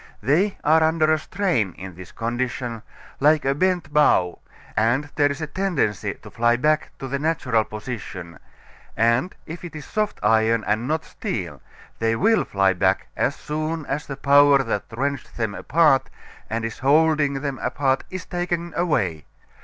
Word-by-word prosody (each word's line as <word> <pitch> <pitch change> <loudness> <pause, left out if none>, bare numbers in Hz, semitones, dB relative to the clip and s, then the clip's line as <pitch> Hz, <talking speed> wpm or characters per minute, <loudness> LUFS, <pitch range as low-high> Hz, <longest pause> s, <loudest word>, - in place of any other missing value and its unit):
They 175 - +2
are 160 +2 +4
under 160 0 +3
a 155 - +1
strain 125 - -1
in 95 0 -9
this 90 +1 -11
condition, 120 0 -3 0.4
like 150 +1 +4
a 135 - +3
bent 175 -1 0
bow, 95 - +3 0.4
and 120 +7 +1
there 145 -1 +3
is 140 +2 -5
a - - -1
tendency 165 - -1
to - - -14
fly 120 +1 +2
back 150 +4 +1
to 135 - -6
the 140 +1 -2
natural 140 -7 +1
position, 105 - -7 0.6
and 115 +10 +2
if 165 +3 -8
it 170 -3 -8
is 150 - -7
soft 215 -1 -2
iron 110 -1 +3
and 110 +4 0
not 160 +2 -1
steel, 85 - -5 0.4
they 115 0 +1
will 225 - +3
fly 95 -1 +2
back 95 +1 +1
as - - 0
soon 155 +1 -3
as 140 +2 -3
the 140 - -6
power 140 0 +5
that 105 - -2
wrenched 135 +3 -3
them 110 -3 -1
apart 140 +2 +3 0.4
and 115 0 -2
is 115 - -5
holding 150 +1 +3
them 140 -2 -3
apart 135 -2 0
is 185 -1 -6
taken 175 -1 -3
away. 115 - 0
140 Hz, 165 wpm, -23 LUFS, 115-155 Hz, 0.6 s, power